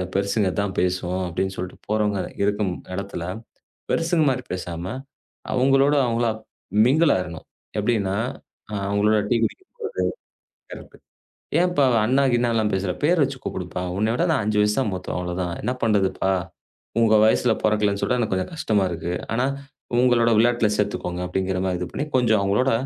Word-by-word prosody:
பெருசுங்க 100 0 +1
இதான் 100 -2 -2
பேசுவோம்! 90 0 0
அப்படின்னு 95 +3 -2
சொல்லிட்டு 90 +1 -6
போறவங்க 105 -2 +1 0.2
இருக்கும் 100 -2 0 0.2
எடத்துல 100 -3 -5 0.7
பெருசுங்க 165 -1 +2
மாரி 125 -1 -1
பேசாம 85 -2 -5 0.7
அவங்களோட 135 +2 +4
அவங்களா 115 -1 +1 0.5
மிங்கில் 150 +4 +4
ஆயிரனும். 85 -3 -6 0.3
எப்படின்னா, 105 -3 +1 0.7
அவங்களோட 100 +2 +2
டீக்குடிக்க 120 - 0 0.2
போறது. 450 +1 -3 0.7
கரெக்ட்! - - -11 0.6
ஏன்ப்பா? 175 -5 +3 0.2
அண்ணா 130 +4 +3
கிண்ணாலாம் 115 -3 +1
பேசுற? 95 -1 -1
பேரு 170 +2 +4
வச்சு 135 0 -4
கூப்பிடுப்பா. 90 0 -4
உன்னை 110 +3 +1
விட 165 - +1
நான் 135 -8 +1
5 105 0 0
வயசு 105 0 +2
தான் 110 - 0
மூத்தவன், 90 -1 -4
அவ்ளோதான். 90 -1 -3
என்ன 125 - 0
பண்றதுப்பா? 95 -3 +2 0.7
உங்க 110 -1 +4
வயசுல 110 - +3
பொறக்கலைன்னு 105 -2 +1
சொல்ற 125 - +1
எனக்குக் 110 -4 0
கொஞ்சம் 95 - -3
கஷ்டமா 110 -10 +1
இருக்கு. 85 +1 -3 0.2
ஆனா, 125 +3 +1 0.5
உங்களோட 120 -2 +4
விளையாட்டுல 115 -1 +3
சேர்த்துக்கோங்க 90 -3 -2
அப்படிங்கற 95 0 -1
மாரி 90 -1 -1
இது 90 - -3
பண்ணி, 145 - -3
கொஞ்சம் 110 -4 +3
அவங்களோட 105 +7 +2
105 Hz, 145 wpm, -23 LUFS, 95-120 Hz, 0.7 s, அவங்களோட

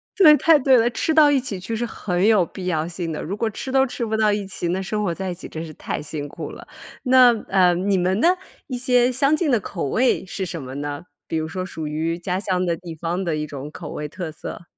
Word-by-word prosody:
对， 315 -7 +8
太 325 -1 +5
对 265 -1 +5
了。 235 0 +3
吃 320 +7 0
到 305 -2 +7
一 280 - +3
起 220 -7 -5
去 225 +5 -4
是 235 +2 -1
很 185 -5 -1
有 210 -5 +5
必 185 +3 -8
要 160 -2 0
性 175 -1 -4
的， 150 - -4
如 195 +5 -4
果 225 0 0
吃 260 +5 -6
都 265 0 +4
吃 245 -2 -4
不 220 0 -1
到 215 -1 +3
一 205 -1 -2
起， 185 -2 -4
那 185 +2 -1
生 210 +2 -2
活 175 -4 0
在 190 +2 -4
一 - - -2
起 180 - -9
真 160 - -6
是 155 - -9
太 - - -4
辛 150 -1 -5
苦 - - -7
了。 - - -11 0.4
那， 255 -2 +7 0.2
呃， 185 -2 +4
你 190 +2 +1
们 185 +2 +1
呢， 325 - +4 0.4
一 255 - -3
些 250 0 +3
相 275 +4 +3
近 310 -2 0
的 240 - +3
口 185 -4 -4
味 245 - +1
是 190 +1 -4
什 170 -4 -5
么 130 0 -8
呢？ 145 0 -4 0.2
比 160 - -2
如 160 - -2
说 185 +3 -4
属 160 -4 -6
于 160 +2 -2
家 180 +1 -2
乡 185 -2 0
的 170 -1 0
地 170 -2 -9
方 170 +4 -2
的 170 -4 -1
一 150 0 -2
种 145 -1 -7
口 160 -1 -8
味 150 - -4
特 170 +1 -6
色？ 160 - -8
185 Hz, 285 characters per minute, -22 LUFS, 165-235 Hz, 0.4 s, 对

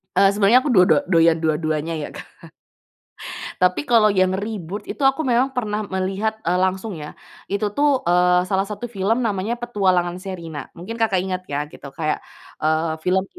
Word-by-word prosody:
Eee, 195 +1 +6
sebenarnya 210 +5 +4
aku 290 - 0
do 185 -6 +6
do 155 - +5
doyan 165 -1 +5
dua-duanya, 155 +1 0
ya, 145 - -5
Kak. - - -8 1.3
Tapi 180 +10 +1
kalau 215 -3 +5
yang 185 -1 +2
reboot 205 -1 -5
itu - - -8
aku 270 +3 +3
memang 250 +1 +2
pernah 215 -3 -1
melihat, 195 +3 -1
eee, 180 +2 +1
langsung, 190 +3 -1
ya. 150 0 -8 0.3
Itu, 205 +1 -1
tuh, 285 +1 +2
eee, 180 +1 +4
salah 195 +1 0
satu 210 +3 -6
film 220 +4 0
namanya 210 +2 -1
Petualangan 185 -7 0
Sherina, 170 -7 -7
mungkin 225 +7 -7
Kakak 195 -5 +2
ingat, 185 -1 -3
ya, 145 +1 -2
gitu. 140 - -11
Kayak, 155 -2 -1 0.4
eee, 160 +1 +1
film, 185 +3 +1
190 Hz, 170 wpm, -21 LUFS, 175-215 Hz, 1.3 s, Eee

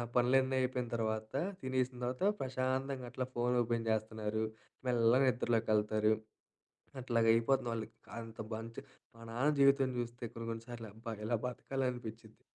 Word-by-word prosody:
పనులన్నీ 130 +2 +4
అయిపోయిన 125 -1 0
తర్వాత 110 -1 -2 0.3
తినేసిన 130 -1 0
తర్వాత 125 +7 -2 0.2
ప్రశాంతంగా 130 0 -1
అట్లా 130 0 -2
ఫోన్ 125 +1 +2
ఓపెన్ 115 -1 0
చేస్తున్నారు. 110 0 -1 0.4
మెల్లగా 120 +2 +5
నిద్రలోకెళ్తారు. 110 -3 +2 0.9
అట్లాగా 115 -2 +2
అయిపోతుంది 120 +2 +2
వాళ్ళకి. 110 -1 -5 0.2
అంత 115 -1 -9
మంచి 115 +1 -5 0.3
మా 115 - -14
నాన్న 125 +6 +2
జీవితం 140 -1 +5
చూస్తే 120 0 -4
కొన్ని, 115 0 -6
కొన్ని 115 0 -6
సార్లు 115 -2 -6
అబ్బా! 115 +1 -6
ఇలా 120 +2 +2
బతకాలనిపిచ్చిద్ది. 120 -4 -4
120 Hz, 130 wpm, -35 LUFS, 115-130 Hz, 0.9 s, మెల్లగా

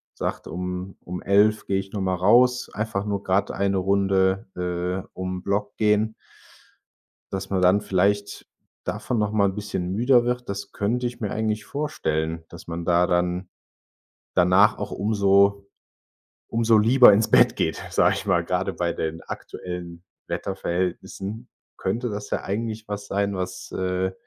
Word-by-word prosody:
sagt: - - -4
„Um 90 +1 -5
um 90 +1 -6
11:00 105 +2 +3
gehe 95 0 +1
ich 95 0 -7
noch 100 - -3
mal 95 -1 0
raus, 125 +7 +4
einfach 105 -2 -2
nur 100 -1 -2
grad 95 +2 +1
eine 100 -1 0
Runde, 95 +1 +2
äh, 90 +1 -3
um 95 0 -4
'n 90 - -15
Block 100 +1 -1
gehen.“ 105 0 +2 1.2
Dass 95 0 -4
man 95 -2 0
dann 95 +3 +5
vielleicht 100 +1 0 0.4
davon 120 - -2
noch 105 -1 +1
mal 105 -2 +3
'n 95 - -3
bisschen 100 -4 -3
müder 120 +4 +4
wird, 125 0 -2
das 100 0 -5
könnte 120 +5 -1
ich 120 - -8
mir 105 -3 -3
eigentlich 110 -1 -1
vorstellen, 80 - -2
dass 85 - -12
man 85 0 -5
da 90 0 +3
dann, 90 +1 0 0.9
danach 90 +4 +5
auch 100 - -5
umso 100 -1 +3 0.8
umso 115 -1 +3
lieber 120 +1 +7
ins 105 +2 +2
Bett - - +6
geht, - - -1
sage - - +3
ich - - -5
mal, - - +2
gerade - - -1
bei 85 -1 -1
den 80 0 -4
aktuellen 90 -1 -7 0.2
Wetterverhältnissen, 95 +4 -3 0.3
könnte 115 +5 -2
das 105 0 -6
ja - - -1
eigentlich 110 +2 -3
was 105 0 -5
sein, 100 0 -1
was, 90 0 -5
äh, 95 0 -1
100 Hz, 160 wpm, -24 LUFS, 90-105 Hz, 1.2 s, lieber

